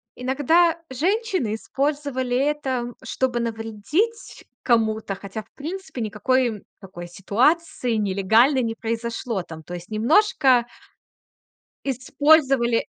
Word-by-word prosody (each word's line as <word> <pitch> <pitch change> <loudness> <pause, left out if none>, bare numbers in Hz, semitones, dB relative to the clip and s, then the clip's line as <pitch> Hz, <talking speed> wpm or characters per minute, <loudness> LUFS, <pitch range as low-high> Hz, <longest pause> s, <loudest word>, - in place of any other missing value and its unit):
иногда 290 +7 +2
женщины 360 - 0
использовали 275 0 -2
это, 270 -3 0 0.2
чтобы 250 -2 -1
навредить 230 - -3 0.2
кому-то, 220 -3 +1
хотя, 200 +2 -7
в - - -36
принципе, 325 -3 -6
никакой 225 +1 0 0.2
такой 175 -2 -9
ситуации 245 - +1
нелегальной 220 +6 +3
не 225 -1 -1
произошло 230 -3 -3
там. 160 -2 -10
То 175 - -7
есть 175 0 -9
немножко 255 - +3 1.2
использовали 270 -2 +3
245 Hz, 95 wpm, -23 LUFS, 220-290 Hz, 1.2 s, нелегальной